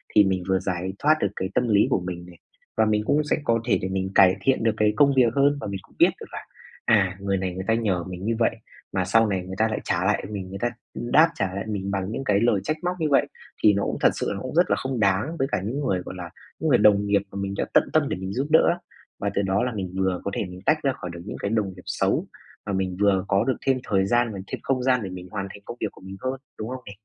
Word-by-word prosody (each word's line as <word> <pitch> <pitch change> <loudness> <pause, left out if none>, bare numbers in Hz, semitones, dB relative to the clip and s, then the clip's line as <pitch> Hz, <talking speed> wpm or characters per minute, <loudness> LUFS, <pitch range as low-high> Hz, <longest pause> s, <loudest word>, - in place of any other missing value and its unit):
Thì 105 - +8
mình 95 -2 0
vừa 95 0 +3
giải 95 0 -3
thoát 155 +1 +4
được - - +3
cái 95 +1 -3
tâm 125 - +2
lý 105 -2 +4
của - - +2
mình 90 -1 -6
này, 90 -1 -14 0.4
và 110 - +4
mình 105 0 +1
cũng 150 +1 +2
sẽ 150 - 0
có 115 -3 +2
thể 120 - +2
để 95 - -2
mình 95 0 -2
cải 95 -1 +7
thiện 130 +1 +2
được 115 -2 +3
cái 105 -1 +3
công 140 -1 +5
việc 120 -3 +4
hơn, 140 +1 +3
và - - -4
mình 100 -1 -4
cũng - - -24
biết - - +7
được - - -8
là, - - -7 0.4
à, 95 -4 +3
người 100 -1 0
này 90 -1 -2
người 95 - -5
ta 115 - +3
nhờ 100 -7 0
mình 90 +1 -7
như 115 +1 +1
vậy 115 - +2 0.4
mà 90 -2 0
sau 115 +4 +4
này 95 -3 -1
người 95 0 -6
ta 110 +1 +3
lại 110 - -2
trả 85 +2 0
lại 105 - +1
mình 95 -3 -5
người 100 0 -7
ta 120 - +1 0.3
đáp 155 +7 +4
trả 95 -1 -1
lại 100 - -3
mình 100 -2 -3
bằng 95 +1 -2
những 135 - -3
cái 100 -5 +2
lời 115 -3 +3
trách 155 +9 -1
móc 180 +1 0
như 155 - +1
vậy, 140 - +3 0.4
thì 105 - +7
nó 100 - 0
cũng - - -2
thật - - +6
sự - - -2
là - - -1
nó 100 - -6
cũng 130 - -6
rất 175 - +4
là - - +3
không 130 -2 -3
đáng 105 - +1
với 135 - +1
cả - - 0
những 125 +7 -2
người, 95 -10 0
gọi - - -7
là, 85 -1 -6 0.3
những 160 - 0
người 125 - +6
đồng 105 -1 +5
nghiệp 100 -1 +2
mà 100 - -7
mình 100 0 -3
đã - - 0
tận - - +4
tâm - - +3
để - - -2
mình 95 +1 -5
giúp 135 +3 -1
đỡ 160 - +6
á. 175 - -8 0.4
Mà 100 - -1
từ 100 - +2
đó 95 +3 +1
là 125 - -1
mình 95 -3 -4
vừa 95 -2 0
có 100 - -1
thể - - -1
mình 90 0 -9
tách 155 - +4
ra 135 -1 +2
khỏi 90 - -7
được 85 - -8
những 105 - -6
cái 100 - -2
đồng 110 -4 +1
nghiệp 90 - -12
xấu, - - 0 0.4
mà 100 - -3
mình 95 -1 -1
vừa 100 -2 +3
có 100 +2 +2
được 130 +1 0
thêm 130 - +4
thời 95 -2 +1
gian 120 0 +2
và 95 - -6
thêm - - -5
không 130 -2 0
gian 125 -1 +3
để 95 - -4
mình 90 0 -8
hoàn 100 -2 -3
thành 100 - -11
công 120 - -7
việc 110 - +1
của - - -18
mình 95 +1 -9
hơn, 130 +1 -2 0.2
đúng 110 +2 -4
không 130 0 -6
nè? 100 - -8
100 Hz, 310 wpm, -24 LUFS, 95-120 Hz, 0.4 s, Thì